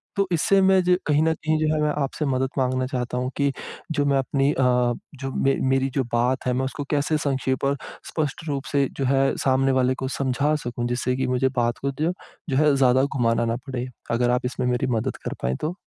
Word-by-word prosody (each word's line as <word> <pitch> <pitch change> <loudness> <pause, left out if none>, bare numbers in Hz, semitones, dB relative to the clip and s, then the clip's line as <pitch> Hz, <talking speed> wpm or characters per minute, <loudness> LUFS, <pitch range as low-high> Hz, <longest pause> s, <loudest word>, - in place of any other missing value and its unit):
तो 200 -2 +1
इससे 185 +4 +3
मैं 190 0 +5
जो 180 0 +4
कहीं 150 0 +3
न 160 0 +3
कहीं 155 0 -1
जो 155 0 +1
है 155 - 0
मैं 150 - +2
आपसे 145 +3 -3
मदद 130 -1 0
माँगना 130 0 +1
चाहता 125 -2 -3
हूँ 125 +1 -1
कि 140 -1 +2 0.4
जो 145 -2 +1
मैं 140 -1 +3
अपनी 135 +1 +1
अ, 130 - 0 0.5
जो 135 0 -5
मे 135 0 +3
मेरी 135 0 +2
जो 135 - +3
बात 125 +3 +1
है 125 - +1
मैं 130 +1 0
उसको 140 +2 -4
कैसे 150 +2 +1
संक्षेप 130 -1 -1
और 140 0 +1 0.3
स्पष्ट 155 0 -2
रूप 140 -1 -2
से 140 -1 +2
जो 135 - -1
है, 135 +1 +2
सामने 135 0 +2
वाले 130 0 +2
को - - 0
समझा 140 +3 +1
सकूँ 120 0 -3
जिससे 120 +1 -1
कि 130 -1 0
मुझे 130 +1 +1
बात 120 -1 +1
को 140 0 -1
जो 165 +3 +1 0.4
जो 130 - +1
है 150 -1 +4
ज़्यादा 130 -1 +4
घुमाना 120 -4 +1
ना 115 0 0
पड़े, 130 -1 -3 0.2
अगर 120 +1 +2
आप 125 0 0
इसमें 125 0 -2
मेरी 125 0 0
मदद 110 - -2
कर - - -2
पाएँ 65 +1 0
तो 160 +4 -2
135 Hz, 230 wpm, -24 LUFS, 125-145 Hz, 0.5 s, मैं